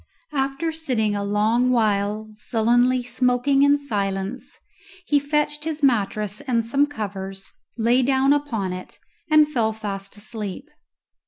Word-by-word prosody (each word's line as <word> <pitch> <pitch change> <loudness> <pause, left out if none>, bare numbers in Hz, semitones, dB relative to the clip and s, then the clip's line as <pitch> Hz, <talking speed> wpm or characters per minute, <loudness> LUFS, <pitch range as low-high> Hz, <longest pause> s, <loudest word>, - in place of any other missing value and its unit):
After 275 +3 -1
sitting 250 -10 -1
a 200 - -2
long 215 +5 +2
while 215 -2 0
sullenly 240 +3 +2
smoking 250 +2 +1
in 285 +1 +5
silence, 200 -3 -4 0.5
he 290 - +3
fetched 300 +1 -1
his 315 -1 -4
mattress 210 -4 +1
and 235 -4 0
some 275 +5 +2
covers, 195 -6 -6 0.3
lay 240 +3 +3
down 265 +2 +3
upon 230 -11 -2
it, 185 0 -9 0.3
and 305 -1 +6
fell 230 -7 0
fast 200 -2 -6
asleep. 215 +5 -6
240 Hz, 130 wpm, -23 LUFS, 210-275 Hz, 0.5 s, and